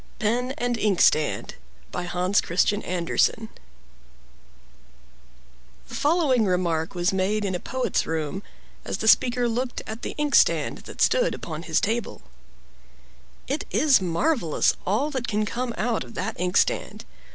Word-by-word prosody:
PEN 245 +4 0
AND 245 -4 -1
INKSTAND 175 -7 +2 0.4
By 180 - -4
Hans 180 +3 +1
Christian 200 +4 +1
Andersen 180 +5 0 2.4
The - - -11
following 290 -7 +2
remark 175 -2 0
was 175 +1 +1
made 200 +3 0
in 190 - -1
a 180 - -2
poet's 260 +6 -1
room, 160 +4 -3 0.4
as - - -4
the 220 - -3
speaker 245 +2 +4
looked 245 +2 -3
at 220 +2 -7
the - - -5
inkstand 295 -1 +2
that - - -2
stood - - +2
upon 160 -1 -6
his 160 -2 +1
table: 225 +3 -3 1.2
"It 285 +3 -2
is 285 -8 +4
marvelous 180 - +1
all 240 +11 +1
that 260 -4 -3
can 215 0 0
come 245 +3 -3
out 230 - -1
of 120 - -13
that - - -3
ink 180 0 0
stand! - - 0
215 Hz, 140 wpm, -24 LUFS, 180-250 Hz, 2.4 s, speaker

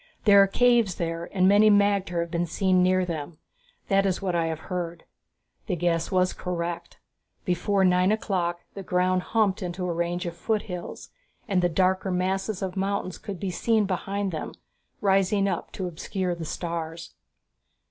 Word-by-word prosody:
"There 200 -2 +7
are 195 - +5
caves 235 -3 +3
there 165 0 -3
and 185 -1 +3
many 205 +2 +6
magter 200 -4 +2
have 170 0 -5
been 170 0 -1
seen 185 +2 +2
near 185 0 +3
them; 160 -2 -5 0.5
that 195 -1 +3
is 190 -2 0
what 190 -3 -2
I 165 -1 +1
have 160 -1 -4
heard." 175 -2 -4 0.6
The 185 - 0
guess 165 -1 0
was 185 -1 +2
correct. 170 -1 -4 0.5
Before 190 +1 +1
nine 180 +1 +3
o'clock 175 -5 -1
the 200 - -7
ground 185 0 +1
humped 210 -2 +1
into 180 0 -4
a 175 - -1
range 170 +2 -2
of 170 -1 -4
foothills, 180 -1 -4 0.4
and 190 -2 +2
the 175 - +2
darker 185 +2 +1
masses 190 +2 -1
of 185 -1 -3
mountains 195 -1 -2
could 195 -3 -7
be 195 -2 -3
seen 220 +3 +1
behind 195 +1 -2
them, 160 - -5 0.5
rising 195 0 +2
up 180 -3 -3
to 190 - -4
obscure 180 +2 -3
the 170 -1 -6
stars. 165 0 -5
185 Hz, 170 wpm, -26 LUFS, 175-195 Hz, 0.6 s, There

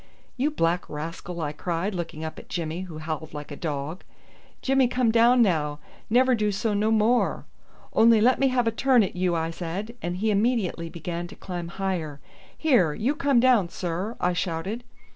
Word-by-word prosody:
"You 270 +4 +1
black 175 - 0
rascal!" 165 +3 -6
I 150 -2 -2
cried, 170 +6 -2
looking 165 -3 -5
up 160 - -6
at - - -15
Jimmy, 170 0 -3
who 155 - -8
howled 155 0 -5
like 150 0 -7
a - - -5
dog. 150 +2 -4 0.6
"Jimmy 270 -1 +3
come 245 -2 +1
down 235 +2 +5
now! 150 -7 0 0.3
Never 255 +3 +4
do 210 -3 +1
so 210 +2 -1
no 210 +2 +1
more." 225 +2 +2 0.5
"Only 225 0 +6
let 245 +4 +4
me 275 - +4
have 255 -2 +1
a 225 - +2
turn 250 0 +4
at 190 - -4
you," 180 -1 +1
I 165 0 -1
said, 185 +7 -5
and 175 +1 -3
he 215 +3 +1
immediately 205 -6 0
began 170 +1 -5
to - - -12
climb 175 -2 -6
higher. 170 -5 -3 0.4
"Here, 215 - +3
you 245 +7 0
come 285 -5 +2
down, 235 -8 +4
sir," 180 +6 -4
I 180 0 +1
shouted. 185 +7 -3
185 Hz, 185 wpm, -26 LUFS, 165-235 Hz, 0.6 s, Only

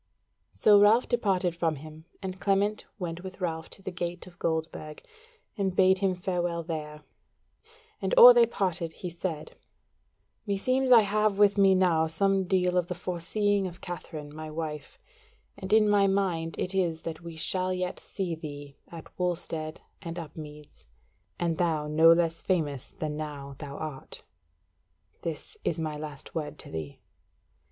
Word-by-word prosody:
So 210 -1 +5
Ralph 220 +4 +5
departed 195 -7 +1
from 165 -2 0
him, 155 +2 -11 0.2
and 190 0 -5
Clement 200 +2 +1
went 175 -3 -5
with 185 +1 -9
Ralph 165 -3 -3
to 195 - -11
the 190 - -4
Gate 175 0 -4
of 175 -1 -16
Goldburg, 160 -2 -3 0.5
and 190 -2 -1
bade 190 0 +5
him 190 -2 +1
farewell 175 -2 -2
there; 150 -2 -6 1.0
and - - -1
or - - +12
they 475 -1 +5
parted 175 -4 -2
he 180 +1 -6
said: 170 -2 -5 0.9
"Meseems 255 +6 +1
I 235 -2 +9
have 210 0 +1
with 205 -1 +5
me 195 -2 +5
now 170 -4 +3
some 195 +4 +1
deal 180 -1 +2
of 175 - -2
the 180 - -4
foreseeing 190 +3 0
of 175 0 -10
Katherine 155 -4 -7
my 155 0 -6
wife, 155 -2 -6 0.6
and 190 - -7
in 215 0 +6
my 205 -1 +4
mind 180 -5 0
it 185 - -2
is 175 -4 0
that 160 -1 -5
we 170 -1 -8
shall 185 +3 0
yet 180 0 -2
see 190 -4 -4
thee 145 -3 -8
at 165 -1 -10
Wulstead 165 -3 -3 0.2
and 170 -2 -6
Upmeads, 150 - -10 0.5
and 170 -2 -1
thou 160 -4 +1
no 160 +2 +6
less 165 -1 +2
famous 150 -8 -1
than 150 -1 -4
now 145 -2 -6
thou 140 -1 -7
art. 150 -4 -7 1.0
This 165 - -6
is 165 - 0
my 155 -2 -2
last 150 -1 -8
word 155 -2 -4
to - - -10
thee." 80 -3 -6
175 Hz, 160 wpm, -28 LUFS, 155-190 Hz, 1.0 s, or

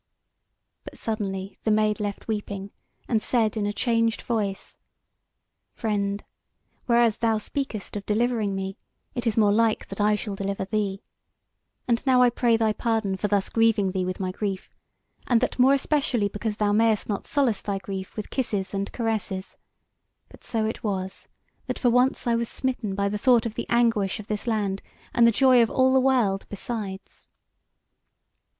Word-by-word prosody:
But - - -10
suddenly 195 -3 -4
the - - 0
Maid 215 0 +2
left 205 -1 -4
weeping, 205 -2 -4 0.4
and 225 -3 +1
said 225 -2 +1
in 210 -2 -1
a - - 0
changed 230 0 +1
voice: 210 -5 -3 1.0
"Friend, 205 -2 -1 0.6
whereas 235 -2 +4
thou 225 -1 +2
speakest 215 -2 -4
of 200 -1 -5
delivering 220 -2 +1
me, 195 +1 -4 0.4
it 240 -1 -3
is 225 - 0
more 210 -2 +5
like 225 +1 +2
that 195 +1 -4
I 210 0 +4
shall 210 -1 -4
deliver 195 0 -3
thee. 200 0 -2 0.8
And 235 -1 +1
now 250 -1 +6
I 245 - +5
pray 235 -1 +2
thy 220 -1 +2
pardon 220 -4 0
for 200 +2 -1
thus 200 -1 +1
grieving 225 -4 +2
thee 185 -1 -1
with 185 0 -3
my 185 -1 -2
grief, 195 0 -4 0.6
and 240 -2 +4
that 255 - -1
more 265 +2 +6
especially 270 -7 +1
because 210 +1 -3
thou 210 -1 +2
mayst 220 0 +2
not 205 -2 -3
solace 265 -8 +1
thy 200 -1 -2
grief 190 -1 -6
with 215 - -5
kisses 205 -7 -2
and 200 0 -2
caresses; 215 -5 -3 0.7
but - - -17
so 225 -2 -1
it 220 - -4
was, 190 -3 -3 0.4
that - - -2
for 245 - +2
once 250 +2 +2
I 235 - +2
was 230 0 0
smitten 245 -7 -2
by 200 0 +1
the 205 +1 -2
thought 240 -1 +4
of 230 - -3
the - - -4
anguish 225 -4 +2
of 215 - -8
this 210 +2 -4
land, 205 -4 0 0.3
and 235 -1 +5
the - - +5
joy 255 +1 +5
of 230 - +3
all 260 0 +3
the 265 - +5
world 245 -7 +2
besides." 200 -2 -6
215 Hz, 175 wpm, -25 LUFS, 200-235 Hz, 1.0 s, now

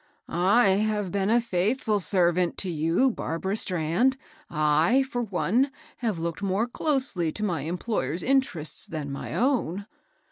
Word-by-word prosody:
" - - -42 0.3
I 205 - +5
have 210 -1 +1
been 200 0 0
a 235 +2 +4
faithful 215 +1 0
servant 180 -2 +1
to 185 - -2
you, 165 - +2
Barbara 190 0 -3
Strand. 185 +8 +1 0.3
J, 155 - +3
for 260 -2 -3
one, 230 +5 +1 0.3
have 225 -7 -2
looked 165 +2 -4
more 200 +3 +1
closely 255 - 0
to 210 - -4
my 175 -8 -1
employer's 170 - -2
in 270 +1 +4
terests 165 - -5
than 150 -3 -5
my 140 - -5
own." 225 - 0
195 Hz, 150 wpm, -26 LUFS, 170-235 Hz, 0.3 s, I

